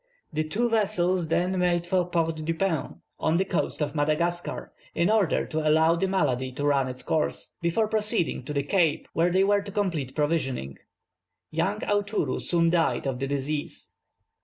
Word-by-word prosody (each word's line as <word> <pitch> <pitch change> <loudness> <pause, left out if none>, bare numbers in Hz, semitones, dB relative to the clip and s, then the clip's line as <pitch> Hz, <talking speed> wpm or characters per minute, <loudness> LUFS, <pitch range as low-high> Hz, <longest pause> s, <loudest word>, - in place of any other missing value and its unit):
The 155 +1 0
two 220 +10 0
vessels 185 -6 +1
then 180 +3 +1
made 175 -1 +1
for 180 0 0
Port 165 -2 0
Dauphin, 165 -2 -2 0.2
on 160 - +2
the 190 - +1
coast 175 -3 -1
of 145 -1 -3
Madagascar, 160 +4 -1 0.2
in 170 +5 +2
order 215 -5 +2
to 155 - -3
allow 160 +2 +4
the 190 +3 0
malady 130 -9 0
to 145 +2 -3
run 140 -2 +2
its 130 0 -7
course, 155 -1 -1
before 170 +6 +1
proceeding 210 - 0
to 150 - -4
the 140 -1 0
Cape, 165 0 +1
where 170 +2 +2
they 185 +2 +3
were 205 +1 +3
to 200 0 -8
complete 170 - -2
provisioning. 140 - -1 0.7
Young 190 +7 -1
Aoutourou 205 +1 0
soon 165 -1 +2
died 170 -4 +1
of 130 -2 -2
the 135 - -2
disease. 145 +2 -3
170 Hz, 170 wpm, -26 LUFS, 150-190 Hz, 0.7 s, allow